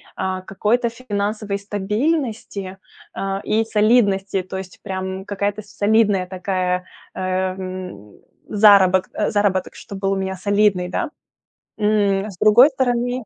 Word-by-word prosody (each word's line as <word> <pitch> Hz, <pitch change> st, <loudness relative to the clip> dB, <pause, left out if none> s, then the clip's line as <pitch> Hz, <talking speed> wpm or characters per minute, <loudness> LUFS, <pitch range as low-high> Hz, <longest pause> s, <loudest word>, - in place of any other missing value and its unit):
а, 185 Hz, 0 st, -2 dB
какой-то 215 Hz, +6 st, 0 dB
финансовой 210 Hz, -3 st, -3 dB
стабильности, 210 Hz, -, -2 dB, 0.4 s
а, 195 Hz, 0 st, -3 dB
и 220 Hz, +1 st, +1 dB
солидности, 210 Hz, -4 st, +2 dB
то 190 Hz, +1 st, -6 dB
есть 185 Hz, -1 st, -9 dB
прям 190 Hz, -1 st, -4 dB
какая-то 205 Hz, +1 st, -2 dB
солидная 205 Hz, -2 st, +1 dB
такая, 185 Hz, -1 st, -2 dB, 0.3 s
э, -, -, -8 dB
м, 185 Hz, -, -4 dB, 0.3 s
заработ 200 Hz, -3 st, +5 dB, 0.2 s
заработок, 200 Hz, -3 st, 0 dB
чтоб 200 Hz, -, -9 dB
был 195 Hz, 0 st, 0 dB
у -, -, 0 dB
меня 190 Hz, 0 st, -3 dB
солидный, 200 Hz, -1 st, +1 dB
да. 180 Hz, -, -2 dB, 0.7 s
М, 210 Hz, -1 st, +1 dB
с 185 Hz, -, -13 dB
другой 240 Hz, +8 st, +6 dB
стороны. 245 Hz, -1 st, -1 dB
200 Hz, 120 wpm, -20 LUFS, 190-215 Hz, 0.7 s, другой